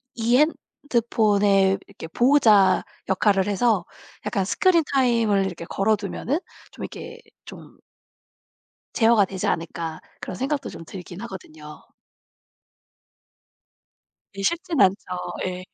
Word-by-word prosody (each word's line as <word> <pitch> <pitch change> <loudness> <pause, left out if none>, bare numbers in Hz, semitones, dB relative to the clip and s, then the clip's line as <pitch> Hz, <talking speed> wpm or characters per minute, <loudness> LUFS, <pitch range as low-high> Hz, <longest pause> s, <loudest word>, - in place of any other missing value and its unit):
이 235 +2 +2
핸드폰의 210 -9 +2
이렇게 200 -5 -10
보호자 215 - +4 0.2
역할을 195 0 +2
해서 205 -2 +1 0.4
약간 195 -2 -1
스크린 340 - +3
타임을 230 -7 +2
이렇게 175 -3 -6
걸어두면 210 - -1 0.3
좀 - - -9
이렇게 470 0 -8 0.3
좀 - - -13 1.2
'제어가 225 -2 +4
되지 190 -1 -4
않을까.' 165 -1 -3 0.2
그런 185 - -6
생각도 275 +5 -2
좀 - - -10
들긴 180 +1 -9
하거든요. 155 -8 -10 2.6
예, - - -4
쉽진 340 - -1
않죠. 195 -1 +5 0.5
예. 185 0 -4
205 Hz, 235 characters per minute, -23 LUFS, 190-245 Hz, 2.6 s, 않죠